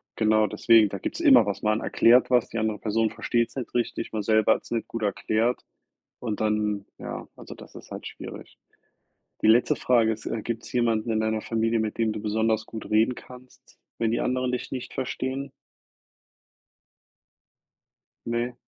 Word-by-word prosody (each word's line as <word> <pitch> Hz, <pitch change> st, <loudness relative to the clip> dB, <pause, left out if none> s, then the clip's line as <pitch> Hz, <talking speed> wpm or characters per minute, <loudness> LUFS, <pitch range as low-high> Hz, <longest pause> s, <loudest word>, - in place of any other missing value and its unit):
Genau 110 Hz, -1 st, +3 dB
deswegen, 110 Hz, +1 st, +4 dB
da 100 Hz, -, -5 dB
gibt's 95 Hz, -, -5 dB
immer 295 Hz, -5 st, +6 dB
was. 100 Hz, -, -3 dB
Man 110 Hz, 0 st, +1 dB
erklärt 120 Hz, +2 st, +4 dB
was, 125 Hz, -2 st, +3 dB
die -, -, -5 dB
andere 110 Hz, -2 st, -1 dB
Person 110 Hz, +1 st, 0 dB
versteht's 120 Hz, -1 st, -1 dB
nicht 130 Hz, -4 st, -5 dB
richtig, 120 Hz, -1 st, -2 dB
man 110 Hz, -1 st, -2 dB
selber 110 Hz, +1 st, +4 dB
hat's -, -, -10 dB
nicht 115 Hz, -1 st, -2 dB
gut 115 Hz, -1 st, -5 dB
erklärt 110 Hz, +3 st, 0 dB, 0.6 s
und 110 Hz, -4 st, -4 dB
dann 105 Hz, -2 st, 0 dB
ja, -, -, -7 dB
also, -, -, -11 dB
das -, -, -14 dB
ist -, -, -12 dB
halt -, -, -6 dB
schwierig. -, -, -10 dB, 0.8 s
Die -, -, +3 dB
letzte 115 Hz, +3 st, +4 dB
Frage 115 Hz, -3 st, +3 dB
ist, 110 Hz, 0 st, -6 dB
äh, 115 Hz, -, -3 dB
gibt's 115 Hz, +1 st, -5 dB
jemanden 115 Hz, -2 st, +1 dB
in 110 Hz, 0 st, +1 dB
deiner 110 Hz, 0 st, -1 dB
Familie, 115 Hz, 0 st, 0 dB
mit 110 Hz, -1 st, -2 dB
dem 115 Hz, -1 st, +1 dB
du 105 Hz, -, -5 dB
besonders 110 Hz, +1 st, 0 dB
gut 110 Hz, -, -8 dB
reden 110 Hz, +4 st, +3 dB
kannst, 125 Hz, +1 st, -15 dB, 0.2 s
wenn 115 Hz, -1 st, 0 dB
die 120 Hz, -, 0 dB
anderen 125 Hz, 0 st, 0 dB
dich 125 Hz, -, -4 dB
nicht 130 Hz, -2 st, -6 dB
verstehen? 130 Hz, +1 st, -3 dB, 2.8 s
Ne? 120 Hz, +1 st, -2 dB
110 Hz, 170 wpm, -26 LUFS, 110-120 Hz, 2.8 s, immer